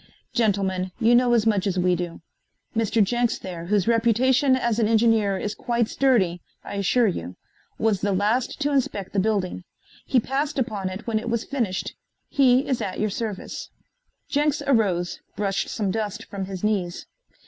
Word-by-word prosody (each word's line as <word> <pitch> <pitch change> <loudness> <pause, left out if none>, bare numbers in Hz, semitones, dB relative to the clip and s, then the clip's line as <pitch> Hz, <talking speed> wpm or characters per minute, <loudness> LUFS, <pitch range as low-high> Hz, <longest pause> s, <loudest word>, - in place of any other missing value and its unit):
Gentlemen, 190 -4 0
you 235 0 +4
know 245 0 +4
as 225 -2 +2
much 205 -3 +2
as 190 -1 -1
we 180 0 +3
do. 175 -1 -5 0.5
Mr. 225 -1 +2
Jenks 240 +3 0
there, 175 -3 -7
whose 200 +1 +1
reputation 235 +4 +3
as 235 -3 0
an 220 - +3
engineer 220 -3 +3
is 210 +2 -3
quite 235 -2 0
sturdy, 200 -12 +2 0.2
I - - -7
assure 230 +5 +3
you, 90 - -2 0.4
was 215 -4 +1
the 205 - +1
last 210 +8 0
to 290 0 +1
inspect 210 -8 -1
the 200 - +1
building. 190 -3 -1 0.4
He 255 - +4
passed 275 +5 -2
upon 215 -7 -1
it 185 +4 -7
when 225 -2 0
it 235 - -5
was 235 -1 0
finished. 230 -10 -2 0.4
He 265 0 +4
is 260 -4 0
at 185 - -4
your 215 -1 0
service." 210 -2 -5 0.6
Jenks 295 0 +1
arose, 195 -9 +1 0.2
brushed 195 -1 -1
some 205 -4 -1
dust 220 +1 -3
from 195 -2 -5
his 190 -1 -7
knees. 190 -5 -1
215 Hz, 170 wpm, -24 LUFS, 190-240 Hz, 0.6 s, you